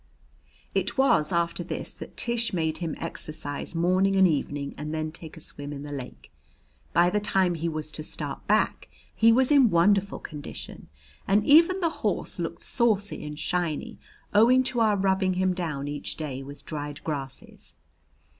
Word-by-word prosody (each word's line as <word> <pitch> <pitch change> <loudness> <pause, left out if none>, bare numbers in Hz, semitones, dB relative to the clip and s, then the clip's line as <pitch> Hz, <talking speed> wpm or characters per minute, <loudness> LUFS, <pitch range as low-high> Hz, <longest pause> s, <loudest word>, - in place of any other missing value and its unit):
It - - -1
was 265 - +3
after 170 0 0
this 175 - -4
that - - -11
Tish 235 -2 -1
made 160 -3 -1
him 165 -3 -3
exercise 155 -2 -4
morning 185 +3 +2
and 190 -1 +6
evening 145 -3 -2
and 150 +1 -5
then 155 0 -2
take 165 0 -9
a - - -8
swim 145 -2 -5
in 145 -1 -6
the 145 - -7
lake. 125 - -8 0.6
By 175 +1 +4
the 210 - +2
time 190 -3 +1
he 165 0 -2
was 155 -1 -3
to 155 - -5
start 155 - -4
back, - - +1 0.2
he 230 0 +5
was 255 +4 +3
in 275 -5 +6
wonderful 195 +3 +3
condition, 150 -2 -8 0.4
and 205 +2 +3
even 335 +6 +6
the 335 -2 +2
horse - - -1
looked - - -4
saucy 215 - +1
and 150 0 -6
shiny, 180 +7 -2 0.3
owing 240 +5 +6
to 255 -2 -1
our 215 -3 +3
rubbing 190 -1 +1
him 185 0 +1
down 155 -6 -3
each 145 0 -4
day 140 -4 -5
with 140 +1 -10
dried 145 -1 -6
grasses. 140 -4 -6
170 Hz, 170 wpm, -26 LUFS, 150-205 Hz, 0.6 s, and